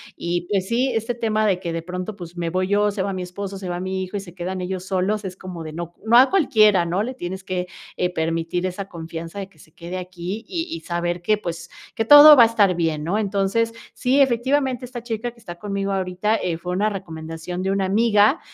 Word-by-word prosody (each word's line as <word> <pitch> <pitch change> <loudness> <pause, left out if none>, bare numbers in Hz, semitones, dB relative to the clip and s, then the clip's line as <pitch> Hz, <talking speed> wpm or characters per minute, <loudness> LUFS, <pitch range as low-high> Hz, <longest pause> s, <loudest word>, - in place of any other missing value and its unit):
Y, 175 0 -3
pues, 195 -2 0
sí, 250 +4 +1
este 225 +1 -1
tema 215 -2 0
de 190 -3 +2
que 170 -3 -4
de 165 - -2
pronto, 180 +4 -5
pues, 175 -2 -10
me 170 -1 -1
voy 185 +2 0
yo, 205 +1 +2
se 200 -1 -3
va 195 0 -2
mi 185 - -4
esposo, 195 +2 -6
se 190 -1 -6
va 175 0 -3
mi 190 0 -3
hijo 185 +2 -5
y - - -2
se 180 -3 -11
quedan 185 +1 -4
ellos 185 0 -4
solos, 195 +2 -1
es 185 -1 -5
como 180 -3 -8
de 155 -1 -7
no. 170 +1 -6
No 235 +2 +6
a 260 +2 +7
cualquiera, 215 - +4
¿no?, 180 +5 0
le 255 - -4
tienes 190 -5 -6
que, 180 -1 -3 0.3
eh, 180 - +1
permitir 165 +2 -1
esa 185 +1 -4
confianza 165 +1 -7
de 195 -1 -6
que 160 - -26
se 160 - -18
quede 170 +3 -7
aquí, 180 +4 -6
y 335 -2 -2
y 335 - -4
saber 175 0 -2
que, 210 +4 +2
pues, 170 -3 -6 0.3
que 225 - 0
todo 290 +4 +11
va 245 - +8
a - - +8
estar 210 -5 +3
bien, 160 -3 -1
¿no? 180 +7 0
Entonces, 205 +3 0 0.2
sí, 260 +3 +1
efectivamente, 260 0 +1
esta 245 -1 -8
chica 235 0 -3
que 235 - -22
está 175 -6 -9
conmigo 200 0 -2
ahorita, 190 +2 0
eh, 175 -3 -2
fue 180 +2 -5
una 205 +4 +1
recomendación 165 -2 -6
de 190 - 0
una 195 -1 +1
amiga, 210 - +3
190 Hz, 240 wpm, -22 LUFS, 175-215 Hz, 0.3 s, todo